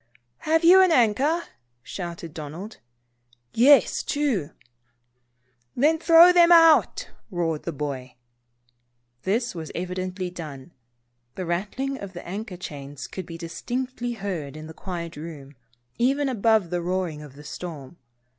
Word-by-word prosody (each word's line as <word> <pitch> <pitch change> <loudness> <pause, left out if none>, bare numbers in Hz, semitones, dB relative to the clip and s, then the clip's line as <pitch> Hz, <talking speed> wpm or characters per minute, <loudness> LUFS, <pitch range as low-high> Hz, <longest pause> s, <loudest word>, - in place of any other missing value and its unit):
" 120 0 -48
Have 325 +1 +3
you 365 +3 +8
an 370 -2 +4
anchor?" 275 +6 +2 0.4
shouted 170 -1 -7
Donald. 165 +8 -8 0.7
"Yes, 270 +5 +5
two." 270 - -1 1.3
"Then, 310 +5 +3
throw 335 +2 +7
them 345 -1 +6
both 345 - +9
out," 330 -2 +4 0.2
roared 165 -5 -2
the 170 - -2
boy. 135 -4 -5 1.1
This 230 +5 -1
was 160 -3 -7
evidently 185 +1 -4
done. 155 -3 -9 0.6
The 185 - -4
rattling 210 +11 -3
of 200 -1 -8
the 175 - -9
anchor 200 +1 -6
chains 140 -4 -8
could 180 +8 -7
be 165 -2 -8
distinctly 245 +9 -4
heard 175 - -5
in 155 - -8
the 160 - -10
quiet 170 -2 -6
room, 150 -3 -9 0.4
even 270 +3 +2
above 220 -6 +2
the 175 -1 -1
roaring 175 -3 -2
of 145 -3 -12
the 145 - -12
storm. 155 -1 -8
185 Hz, 135 wpm, -24 LUFS, 160-250 Hz, 1.3 s, both